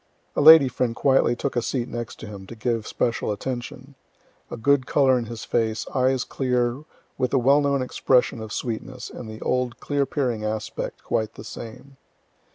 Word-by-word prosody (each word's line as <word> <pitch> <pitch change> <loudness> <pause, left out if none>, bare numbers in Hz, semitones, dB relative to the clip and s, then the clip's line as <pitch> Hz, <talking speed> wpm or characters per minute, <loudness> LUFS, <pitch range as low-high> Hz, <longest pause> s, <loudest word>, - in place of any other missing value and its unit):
A - - +1
lady 155 -2 +9
friend 125 -2 -1
quietly 135 -3 +3
took 135 +2 -3
a 120 - +2
seat 120 0 -2
next 120 -4 -6
him, 100 -3 -9
to 115 - -9
give 115 -1 -2
special 115 -2 -1
attention. 125 +4 -5 0.6
A - - -6
good 135 +2 +2
color 135 -3 +4
in 120 - -4
his 115 -2 -7
face, 110 -1 0
eyes 130 -1 +2
clear, 125 +1 -1 0.3
with 125 - +1
the 135 - +2
well 135 +4 +4
known 140 -2 +1
expression 125 -2 +1
of 110 -1 -7
sweetness, 125 +3 -5
and 115 - -8
the 110 0 -9
old 125 -1 -1
clear 140 -1 -1
peering 125 -7 -1
aspect 110 0 -4
quite 110 -1 -2
the - - -9
same. 130 +4 -10
125 Hz, 175 wpm, -24 LUFS, 115-135 Hz, 0.6 s, lady